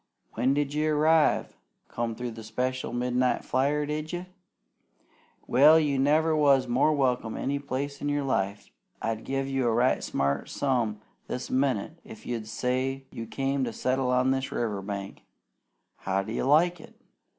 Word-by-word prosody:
When 130 Hz, +3 st, +1 dB
d'you 145 Hz, +2 st, 0 dB
arrive? 155 Hz, +1 st, +3 dB, 0.3 s
Come 115 Hz, -1 st, -3 dB
through 125 Hz, 0 st, -4 dB
by 115 Hz, -, -12 dB
the 115 Hz, -, -8 dB
special 125 Hz, +4 st, -2 dB
midnight 125 Hz, +1 st, 0 dB
flyer, 145 Hz, +3 st, +1 dB
did 150 Hz, +1 st, -4 dB
you? 175 Hz, 0 st, -4 dB, 1.2 s
Well, 150 Hz, +6 st, +6 dB
you 145 Hz, -3 st, 0 dB
never 155 Hz, +3 st, +3 dB
was 140 Hz, -4 st, +4 dB
more 125 Hz, +5 st, +3 dB
welcome 125 Hz, -6 st, 0 dB
any 140 Hz, +1 st, -1 dB
place 140 Hz, +1 st, -4 dB
in 145 Hz, -, -1 dB
your 145 Hz, 0 st, 0 dB
life. 100 Hz, -6 st, -2 dB, 0.3 s
I'd 115 Hz, 0 st, -3 dB
give 135 Hz, 0 st, -2 dB
a 135 Hz, -1 st, -1 dB
right 120 Hz, +3 st, +2 dB
smart 70 Hz, 0 st, -1 dB
sum 120 Hz, -6 st, -1 dB, 0.3 s
this 125 Hz, -, -5 dB
minnit 135 Hz, +3 st, 0 dB
if 110 Hz, -, -12 dB
you'd 115 Hz, -3 st, -4 dB
say 130 Hz, +3 st, -2 dB
you 115 Hz, 0 st, -7 dB
came 135 Hz, +4 st, -1 dB
to 120 Hz, -, -2 dB
settle 130 Hz, +2 st, 0 dB
on 125 Hz, +1 st, +3 dB
this 135 Hz, 0 st, -1 dB
river 105 Hz, -4 st, -2 dB
bank. 100 Hz, 0 st, -6 dB, 0.8 s
How 95 Hz, +1 st, -1 dB
do 110 Hz, -, -6 dB
you -, -, -1 dB
like 165 Hz, +5 st, +4 dB
it? -, -, -16 dB
130 Hz, 160 wpm, -27 LUFS, 115-145 Hz, 1.2 s, Well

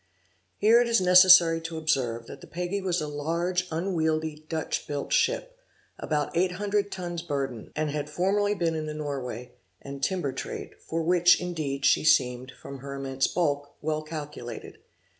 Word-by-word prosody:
Here 225 Hz, +3 st, +5 dB
it 240 Hz, -, +1 dB
is 235 Hz, 0 st, +3 dB
necessary 180 Hz, -2 st, +7 dB
to 165 Hz, 0 st, -6 dB
observe, 130 Hz, -7 st, -1 dB
that 135 Hz, -, -11 dB
the -, -, -12 dB
Peggy 180 Hz, +3 st, -3 dB
was 180 Hz, -3 st, 0 dB
a 150 Hz, -, -3 dB
large 170 Hz, +5 st, -1 dB
unwieldy 160 Hz, -3 st, -1 dB
Dutch 160 Hz, -1 st, -3 dB
built 145 Hz, -1 st, -3 dB
ship, -, -, +1 dB, 0.4 s
about 150 Hz, 0 st, -2 dB
eight 180 Hz, +1 st, +2 dB
hundred 205 Hz, +1 st, -1 dB
tons 175 Hz, -2 st, -4 dB
burden, 135 Hz, -8 st, -4 dB
and 155 Hz, -1 st, -1 dB
had 150 Hz, 0 st, -3 dB
formerly 200 Hz, +6 st, +1 dB
been 170 Hz, -4 st, 0 dB
in 155 Hz, -1 st, -3 dB
the 150 Hz, -, -5 dB
Norway, 130 Hz, -5 st, -5 dB, 0.3 s
and 140 Hz, 0 st, -9 dB
timber 165 Hz, -5 st, -1 dB
trade, -, -, -6 dB
for 165 Hz, 0 st, -3 dB
which, 175 Hz, +1 st, +5 dB
indeed, 150 Hz, -6 st, -3 dB
she -, -, +4 dB
seemed, 130 Hz, -3 st, +2 dB
from 140 Hz, -1 st, -9 dB
her 140 Hz, +1 st, -7 dB
immense 135 Hz, -1 st, -1 dB
bulk, 145 Hz, -4 st, -1 dB
well 155 Hz, 0 st, -2 dB
calculated. 150 Hz, -7 st, -8 dB
160 Hz, 165 wpm, -27 LUFS, 140-180 Hz, 0.4 s, necessary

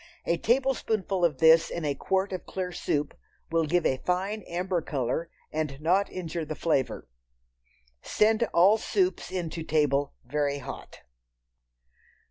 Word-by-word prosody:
A 170 Hz, -, +1 dB
tablespoonful 225 Hz, -6 st, 0 dB
of 160 Hz, -5 st, +2 dB
this 160 Hz, +2 st, +6 dB
in 170 Hz, -2 st, -4 dB
a 145 Hz, -, +1 dB
quart 190 Hz, +7 st, -1 dB
of 185 Hz, -, -6 dB
clear 185 Hz, -1 st, -3 dB
soup 150 Hz, -4 st, -2 dB, 0.4 s
will 165 Hz, -1 st, +2 dB
give 175 Hz, +2 st, +1 dB
a 130 Hz, -, +2 dB
fine 190 Hz, +4 st, -1 dB
amber 180 Hz, 0 st, -1 dB
color 140 Hz, +4 st, -2 dB, 0.2 s
and 150 Hz, -3 st, -3 dB
not 180 Hz, +6 st, +2 dB
injure 170 Hz, -2 st, -4 dB
the 155 Hz, 0 st, -5 dB
flavor. 145 Hz, -6 st, -1 dB, 0.9 s
Send 220 Hz, +1 st, +2 dB
all 195 Hz, +6 st, +5 dB
soups 370 Hz, -, 0 dB
in 175 Hz, -4 st, -3 dB
to 165 Hz, -, -5 dB
table 145 Hz, -3 st, +1 dB
very 145 Hz, +2 st, -1 dB
hot. 140 Hz, -, -9 dB
170 Hz, 140 wpm, -27 LUFS, 150-190 Hz, 0.9 s, this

